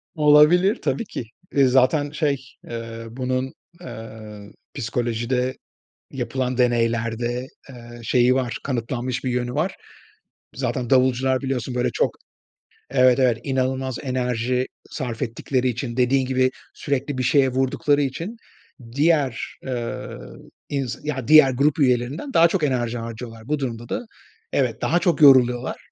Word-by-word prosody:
Olabilir, 155 +7 +5
tabii 230 - -1
ki. 125 - -6 0.3
Iıı, 135 -2 +5
zaten 135 +3 +3
şey, 140 -4 -1 0.2
eee, 115 -1 -6
bunun, 130 +3 -2 0.3
eee, 110 -5 -10 0.2
psikolojide 120 +1 -2 0.5
yapılan 125 0 -3
deneylerde, 120 0 0 0.2
eee, 120 -2 -11
şeyi 125 +2 +3
var, 125 -2 -1
kanıtlanmış 125 0 -3
bir 130 - 0
yönü 125 0 -2
var. 160 +6 -1 0.8
Zaten 125 -2 -2
davulcular 130 0 +3
biliyorsun 130 -2 -2
böyle, 125 0 0
çok, - - 0 0.8
evet, 125 -1 +4
evet, 125 -3 +3
inanılmaz 130 -1 -1
enerji 125 -1 -1 0.2
sarf 120 -4 -5
ettikleri 125 +2 -1
için, 120 0 -4
dediğin 130 +1 +3
gibi, 130 0 +2 0.2
sürekli 140 0 -2
bir 130 - -1
şeye 135 +1 +4
vurdukları 135 +3 +1
için, 165 - -4 0.6
diğer, 145 -3 +1
ııı, 120 -3 -5 0.3
ins 135 -5 -2
ya, 135 -5 -3
diğer 155 -3 +8
grup 140 +4 +1
üyelerinden 130 - 0
daha 165 +1 +6
çok 175 -1 -1
enerji 120 -4 0
harcıyorlar. 115 0 -8
Bu 150 0 0
durumda 120 -3 -5
da 245 - -3 0.5
evet, 120 -5 0
daha 175 - +2
çok 170 -2 +1
yoruluyorlar 125 -3 +5
130 Hz, 130 wpm, -23 LUFS, 120-140 Hz, 0.8 s, diğer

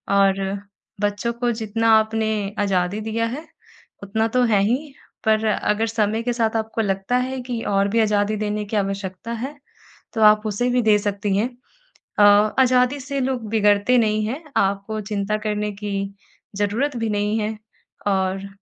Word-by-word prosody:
और 195 0 +3 0.6
बच्चों 205 +3 -1
को 240 0 -1
जितना 225 0 0
आपने 220 0 -1 0.3
आज़ादी 195 0 0
दिया 225 +1 -1
है 320 - -10 0.6
उतना 220 +3 0
तो 250 - +4
है 200 -2 +4
ही 265 +7 -1 0.3
पर 220 0 +3
अगर 215 +1 +1
समय 220 0 0
के 245 - 0
साथ 230 -2 0
आपको 220 +1 -2
लगता 195 +3 -1
है 260 +1 -2
कि 245 -2 -4
और 200 0 +2
भी 230 - +3
आज़ादी 210 0 +1
देने 210 0 -2
की 205 - -5
आवश्यकता 195 +1 -3
है 275 +3 -4 0.6
तो 225 - -2
आप 210 0 +6
उसे 215 +4 0
भी 250 0 +2
दे 215 -2 +5
सकती 200 -1 -1
हैं। 225 +5 +1 0.7
अ 205 - +7 0.4
आज़ादी 255 +2 +3
से 280 +1 -3
लोग 250 -4 -2
बिगड़ते 210 +2 +3
नहीं 215 -1 +1
हैं 265 +9 -4
आपको 200 +2 0
चिंता 210 0 -2
करने 210 0 -1
की 205 -1 -3 0.6
ज़रूरत 235 +7 0
भी 225 -1 -1
नहीं 205 +1 0
है 215 0 -2 0.5
और 190 0 0
215 Hz, 165 wpm, -22 LUFS, 205-230 Hz, 0.7 s, अ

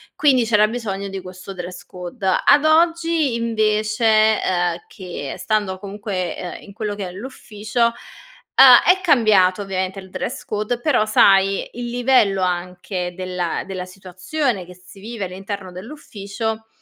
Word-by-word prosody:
Quindi 260 -5 +3
c'era 215 -2 +4
bisogno 210 -4 -4
di 195 0 -5
questo 185 +1 -10
dress 180 0 -8
code. 180 +4 -7 0.2
Ad 290 - +6
oggi, 330 -2 +2
invece 215 -1 +2
uhm, 175 -2 0
che 175 -7 -7
stando 205 -4 -1
comunque, 195 -3 -4
uhm, 180 - -7
in 200 - -13
quello 210 -1 -4
che 200 -2 -5
è 180 - -8
l'ufficio, 215 +1 -3
uhm, 235 - -3 1.0
è 380 - -12
cambiato 215 - +3
ovviamente 190 0 -3
il 190 - -12
dress 265 - -5
code. 215 +3 -2
Però, 245 -5 +2
sai, 195 -2 +4
il 240 0 -5
livello 240 -6 +2
anche 180 0 -3
della 180 -2 -3
della 185 -1 -5
situazione 190 - -3
che 180 - -12
si 180 +2 -17
vive 220 -1 -5
all'interno 190 +1 -7
dell'ufficio, 220 0 -6
200 Hz, 145 wpm, -20 LUFS, 185-230 Hz, 1.0 s, Ad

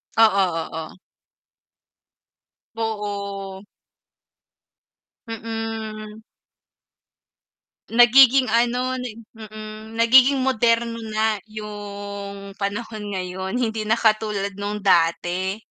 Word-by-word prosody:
Oo, 200 -4 +5 0.3
oo. 160 +1 -7 1.8
Oo. 200 -3 -4 1.6
Mm. 225 -1 -6 1.7
Nagiging 250 +2 +6
ano 245 +2 +1
nag 240 -3 -6 0.2
mm, 215 0 -9
nagiging 255 +3 +5
moderno 230 -2 +1
na 215 -1 0
yung 200 -2 -7
panahon 210 0 -4
ngayon 190 +2 -4
hindi 220 -3 -1
na 225 - +3
katulad 215 -3 +1
nung 205 0 -4
dati. 180 +2 +1
215 Hz, 70 wpm, -22 LUFS, 200-230 Hz, 1.8 s, Nagiging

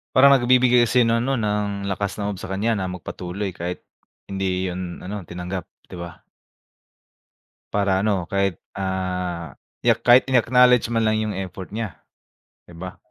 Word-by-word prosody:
Parang 140 +1 +8
nagbibigay 125 -1 +5
kasi 125 -2 +4
ng 115 0 +2
ano, 135 +2 0
ng, 105 -2 -1
lakas 100 +1 -2
ng 105 0 -2
loob 95 - -9
sa - - -7
kanya 105 +4 0
na 95 -3 -2
magpatuloy, 90 +2 -5
kahit 90 +1 -5 0.4
hindi 95 -1 -2
'yon 90 -1 -4
ano, 100 +1 -5
tinanggap, 90 +2 -6 0.2
'di - - -11
ba? 85 -1 -10 1.5
Para 100 -2 +2
ano, 100 -4 0
kahit, 100 -1 0 0.2
ah, 90 -4 -3 0.3
i-ack - - +3
kahit 125 +1 +7
in-acknowledge 125 -1 +4
man 115 -1 +1
lang 110 0 +2
yung 105 -3 -2
effort 95 -1 -6
niya, 110 -4 -5 0.7
'di 85 - -14
ba? 95 +2 -7
100 Hz, 155 wpm, -23 LUFS, 90-115 Hz, 1.5 s, Parang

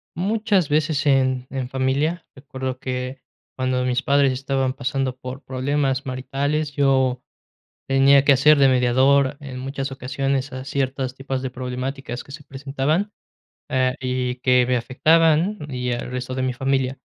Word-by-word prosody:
Muchas 200 -1 +1
veces 150 0 +1
en 130 -2 +2
en 130 -2 -4
familia, 140 +6 0
recuerdo 130 -2 -6
que 130 0 -4 0.3
cuando 130 -1 0
mis 125 0 0
padres 140 -1 +3
estaban 135 0 -1
pasando 135 -1 -2
por 130 +1 -7
problemas 135 0 -1
maritales, 140 +3 -2
yo 130 -3 +2 0.6
tenía 135 +1 +5
que 140 - +7
hacer 150 +3 +5
de 140 -1 +6
mediador 130 +2 +3
en 135 -3 -8
muchas 135 +1 -4
ocasiones 135 +1 -2
a 130 0 -7
ciertas 130 -2 -2
tipos 135 -1 -4
de 130 -1 -4
problemáticas 125 0 -5
que 140 - -12
se 145 +1 -9
presentaban, 145 +9 -2 0.6
eh, 130 -1 +1
y 125 -1 -2
que 125 -1 +4
me 125 0 +2
afectaban, 160 - +3
y 125 -2 -2
al 120 +1 -4
resto 125 0 -4
de 130 - -1
mi 130 -1 0
familia. 135 0 -1
135 Hz, 150 wpm, -22 LUFS, 130-140 Hz, 0.6 s, que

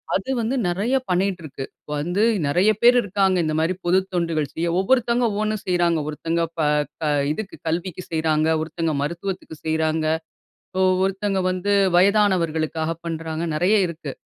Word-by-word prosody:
அது 195 +8 -2
வந்து 235 +4 -1
நெறைய 200 +9 0
பண்ணிட்டிருக்கு. 180 -7 -1 0.2
இப்ப - - -23
வந்து 175 +7 0 0.2
நெறைய 180 +9 +3
பேர் 245 +1 +6
இருக்காங்க 195 -2 +1
இந்த 155 - -1
மாரி 165 +3 +1
பொதுத் 190 +2 +2
தொண்டுகள் 165 -4 -1
செய்ய. 170 +1 -2
ஒவ்வொருத்தங்க 245 +2 +2
ஒவ்வொண்ணு 215 +1 -1
செய்றாங்க. 175 -2 +2
ஒருத்தங்க 165 +2 -1 0.2
ப - - +2 0.4
க 150 -2 +1 0.2
இதுக்கு 210 +4 -7
கல்விக்கு 175 +2 -3
செய்றாங்க, 155 -1 +1 0.2
ஒருத்தங்க 160 0 -2
மருத்துவத்துக்கு 170 +2 -4
செய்றாங்க, 160 0 0 0.6
இப்போ 190 0 0 0.2
ஒருத்தங்க 195 0 -1
வந்து 185 +3 -1 0.2
வயதானவர்களுக்காக 170 -5 +2
பண்ணுறாங்க. 165 0 -4
நெறைய 185 +7 +3
இருக்கு. 155 -4 -7
175 Hz, 140 wpm, -22 LUFS, 160-195 Hz, 0.6 s, பேர்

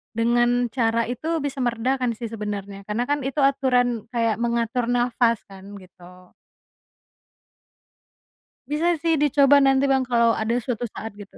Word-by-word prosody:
dengan 240 +1 +1
cara 230 -2 +1
itu 315 +6 -2
bisa 280 -1 -4
meredakan 245 0 -1
sih 230 -1 -7
sebenarnya. 200 -2 -6
Karena 220 +3 -1
kan 290 0 +1
itu 285 +2 -4
aturan 250 -4 +1
kayak 230 -1 0
mengatur 235 0 -1
nafas 240 -1 +1
kan, 190 -1 -13 0.2
gitu. 180 0 -17 2.4
Bisa 305 +3 0
sih 330 -2 +1
dicoba 285 -1 +4
nanti, 270 -1 +3
Bang, 265 -1 +2
kalau 235 -2 +2
ada 220 +2 -1
suatu 240 0 -3
saat, 225 0 -7
gitu. 205 -1 -12
240 Hz, 135 wpm, -23 LUFS, 225-265 Hz, 2.4 s, dicoba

